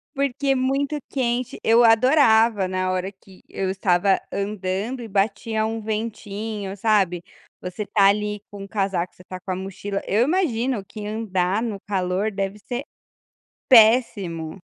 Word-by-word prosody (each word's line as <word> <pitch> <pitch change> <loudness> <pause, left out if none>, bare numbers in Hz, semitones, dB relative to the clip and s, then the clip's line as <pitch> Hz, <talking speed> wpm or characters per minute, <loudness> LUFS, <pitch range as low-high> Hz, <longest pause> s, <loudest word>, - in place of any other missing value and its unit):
porque 275 0 -1
é 270 - +4
muito 275 +3 0
quente, 250 -2 -2
eu 230 +2 +5
adorava 225 -4 +4
na 185 0 -1
hora 185 +1 -2
que 190 -1 -19
eu 190 -1 -2
estava 190 0 +2
andando 200 +4 -3
e 230 - -7
batia 215 +2 0
um 225 0 -3
ventinho, 210 -2 -4
sabe, 190 -5 +2 0.4
você 180 +3 -5
tá 200 -1 +3
ali 210 0 +1
com 200 -1 -8
casaco, 195 -4 -2
você 180 - -16
tá 185 0 -8
com 185 - -6
a - - -1
mochila, 195 +1 -5
eu 215 +4 +3
imagino 260 - 0
que 210 +1 -8
andar 205 -2 -1
no 220 -4 -3
calor 195 +1 -1
deve 195 +1 -3
ser 245 +6 -5 0.8
péssimo! 215 - +4
210 Hz, 150 wpm, -23 LUFS, 190-230 Hz, 0.8 s, eu